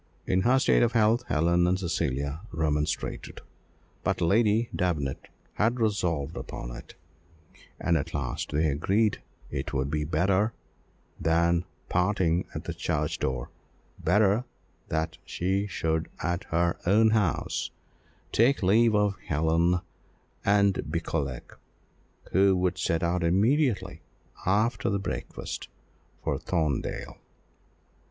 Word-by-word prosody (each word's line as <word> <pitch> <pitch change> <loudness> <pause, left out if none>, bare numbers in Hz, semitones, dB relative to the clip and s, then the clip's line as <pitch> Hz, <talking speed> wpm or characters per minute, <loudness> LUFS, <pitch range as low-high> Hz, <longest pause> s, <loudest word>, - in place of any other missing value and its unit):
In 90 0 +2
her 125 +6 +4
state 130 - +4
of 120 0 +3
health, 115 +1 +3
Helen 85 +3 +3
and 90 +1 +2
Cecilia 75 -4 -2
remonstrated, 75 -2 -2 0.6
but - - 0
Lady 110 +5 +3
Davenant 80 -7 -1 0.3
had 115 +4 +1
resolved 85 -9 0
upon - - -6
it, - - -11 0.8
and 85 -1 +1
at 80 +1 -1
last 70 -7 -3
they 75 +2 +1
agreed 100 +9 +1 0.3
it 65 +2 -4
would 70 +1 -1
be 75 -1 0
better 95 +7 +1 0.7
than 85 +1 +2 0.2
parting 90 -2 +1
at - - -4
the - - -4
church - - -2
door 65 -2 -2 0.5
better 105 +2 +3 0.4
that 80 +1 -2
she 95 +3 -1
should 80 -3 -1
at 85 +3 -1
her 85 +1 0
own 110 +3 +5
house 105 -7 0 0.6
take 120 +1 +3
leave 110 +4 +4
of 105 -2 +1
Helen 80 +3 +2 0.6
and 100 -1 +3
Beauclerc, 65 -3 -3 0.7
who 95 +1 +4
would 90 0 0
set 85 -2 0
out 85 +1 +1
immediately 110 - +2 0.5
after 105 +5 +2
the 100 - +1
breakfast 100 - -5 0.6
for - - -1
Thorndale. 80 -6 -2
90 Hz, 115 wpm, -27 LUFS, 80-105 Hz, 0.8 s, own